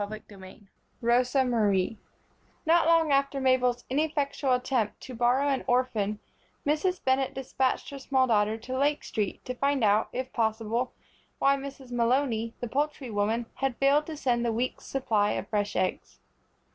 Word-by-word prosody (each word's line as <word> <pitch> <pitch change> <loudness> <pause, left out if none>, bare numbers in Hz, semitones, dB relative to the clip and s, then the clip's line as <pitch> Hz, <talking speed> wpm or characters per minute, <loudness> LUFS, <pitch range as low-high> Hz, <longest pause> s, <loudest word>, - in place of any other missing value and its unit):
CHAPTER 205 -2 -9
II 190 +3 -13 0.4
Rosa 250 +3 +2
Marie 215 -4 +1 0.7
NOT 330 0 +4
long 330 -2 +4
after 275 0 +2
Mabel's 250 -2 +2
ineffectual 280 -1 0
attempt 250 -3 0
to 255 - -9
borrow 245 +4 +2
an 275 -2 0
orphan 225 -5 +1 0.5
Mrs. 310 +5 0
Bennett 265 0 +1
dispatched 265 0 -1
her 280 - -7
small 265 -1 +2
daughter 215 -2 +2
to 255 +3 -6
Lake 290 +2 +1
Street 210 -4 -3
to 255 - -3
find 275 0 0
out, 210 +1 +3
if 255 +1 -5
possible, 225 +2 -1 0.4
why 275 0 +4
Mrs. 270 -2 -8
Malony, 235 -1 +1
the 245 - -2
poultry 280 0 -2
woman, 215 +3 0
had 270 -3 -1
failed 285 +2 +3
to 315 -2 -6
send 240 -4 +1
the 235 - +1
week's 240 +3 -3
supply 220 -6 +1
of - - -4
fresh 205 -1 -1
eggs. 185 - -2
255 Hz, 160 wpm, -28 LUFS, 225-275 Hz, 0.7 s, NOT